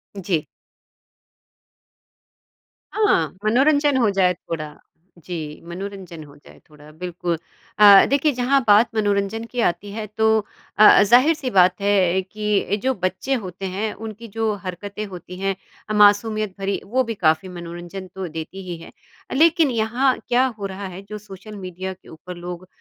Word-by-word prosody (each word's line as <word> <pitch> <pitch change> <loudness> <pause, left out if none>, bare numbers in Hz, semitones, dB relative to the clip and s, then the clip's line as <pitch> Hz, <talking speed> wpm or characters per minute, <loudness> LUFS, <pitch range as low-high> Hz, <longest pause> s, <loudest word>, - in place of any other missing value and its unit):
जी। 180 -5 -2 2.5
हाँ, 185 - +2
मनोरंजन 285 +4 +3
हो 230 -5 +3
जाए 190 -2 +2
थोड़ा, 165 -3 -6 0.5
जी, 160 -3 -7
मनोरंजन 185 -3 -7
हो 145 -1 -15
जाए 145 - -18
थोड़ा 150 0 -16
बिल्कुल। 175 +1 -4 0.4
अ, 200 -2 +9
देखिए 285 +2 +2
जहाँ 255 +3 +2
बात 210 +3 +6
मनोरंजन 205 +1 0
की 245 - -4
आती 175 +4 -7
है 215 +1 -5
तो 220 +2 0 0.5
अ 215 - +6
अ, - - +7
ज़ाहिर-सी 255 +6 +3
बात 180 +1 +5
है 190 -2 +2
कि 210 +1 -1
अ, 200 - -1
जो 260 +6 -1
बच्चे 190 +9 -2
होते 185 +1 -7
हैं 215 +2 -2
उनकी 220 +2 -9
जो 225 -1 0
हरकतें 200 +4 -5
होती 180 0 -9
हैं 195 0 -1 0.3
अ, 215 - -1
मासूमियत 210 0 +3
भरी, 195 +1 -1
वो 255 +6 +1
भी 230 -2 -4
काफ़ी 160 +4 +2
मनोरंजन 175 +2 -8
तो 190 -1 -4
देती 190 +5 -7
ही 175 - -4
है, - - -12 0.4
लेकिन 325 -1 +4
यहाँ 240 +4 +1
क्या 250 +2 +3
हो 200 - -4
रहा 195 0 -6
है 190 - -8
जो 215 - -5
सोशल 210 0 -11
मीडिया 185 +1 -5
के 185 - -20
ऊपर 180 +3 -10
लोग 180 +1 -7
200 Hz, 160 wpm, -21 LUFS, 180-225 Hz, 2.5 s, अ